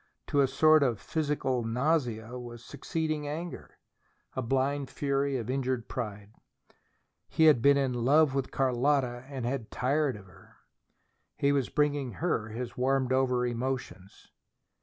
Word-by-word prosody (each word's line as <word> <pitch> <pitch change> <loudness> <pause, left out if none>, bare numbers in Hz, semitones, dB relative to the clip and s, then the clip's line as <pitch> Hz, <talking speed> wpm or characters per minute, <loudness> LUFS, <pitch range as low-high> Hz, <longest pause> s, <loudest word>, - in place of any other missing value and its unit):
To 145 - +3
a 135 - +4
sort 155 +3 +5
of 120 -7 +1
physical 145 -1 -1
nausea 125 -2 -1
was 120 -1 -9
succeeding 155 -2 -3
anger, 165 +4 -6 0.6
a 130 - -1
blind 135 +3 0
fury 140 -1 -1
of 115 -3 -5
injured 130 -2 -1
pride. 105 -3 -6 1.0
He 160 - +2
had 150 -7 +6
been 140 +3 +5
in 135 -2 +1
love 135 +4 +3
with 135 -1 -1
Carlotta 130 -1 +1
and 130 -4 -5
had 125 -2 -3
tired 140 +2 0
of 100 -2 -11
her. 90 - -19 0.8
He 140 - +2
was 140 -3 0
bringing 145 -4 0
her 135 -10 -1
his 120 +2 -6
warmed 130 0 +1
over 125 -2 +2
emotions. 120 -5 -5
130 Hz, 140 wpm, -29 LUFS, 120-145 Hz, 1.0 s, had